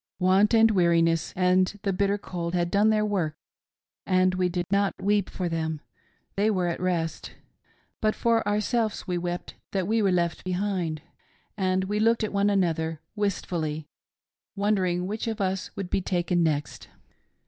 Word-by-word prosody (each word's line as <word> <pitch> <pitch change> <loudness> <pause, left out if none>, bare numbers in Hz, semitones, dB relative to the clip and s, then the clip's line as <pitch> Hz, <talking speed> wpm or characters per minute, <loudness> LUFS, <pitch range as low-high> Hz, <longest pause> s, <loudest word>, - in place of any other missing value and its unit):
Want, 195 +4 +4
and 225 0 +6
weariness, 165 -4 +2
and 185 +2 +2
the 195 - 0
bitter 200 +2 +1
cold 175 -3 -4
had 175 0 0
done 205 +2 +4
their 215 -1 +2
work, 180 -7 -1 0.7
and 185 -1 +2
we 185 -1 +1
did 175 0 -2
not 200 0 +1
weep 205 -1 +1
for 180 - -3
them 160 -2 -2 0.3
— - - -41
they 205 +2 +2
were 185 -4 +1
at 170 -1 -2
rest; 170 -3 -2 0.7
but 215 0 +2
for 230 -2 +1
ourselves 215 +1 0
we 180 -3 -1
wept 175 0 -4 0.2
that 190 -2 0
we 225 +1 +2
were 195 -2 +3
left 170 -2 0
behind 180 -4 -2 0.3
— - - -38
and 190 -2 +1
we 205 +2 -1
looked 230 +1 +3
at 215 - -2
one 200 +1 +2
another, 165 -5 0 0.2
wistfully, 160 -7 -2 0.7
wondering 190 -3 +1
which 215 +4 -4
of 225 -1 -3
us 190 -1 -1
would 190 -2 -5
be 195 - +1
taken 175 -1 0
next. 150 -3 -1
185 Hz, 170 wpm, -26 LUFS, 175-205 Hz, 0.7 s, and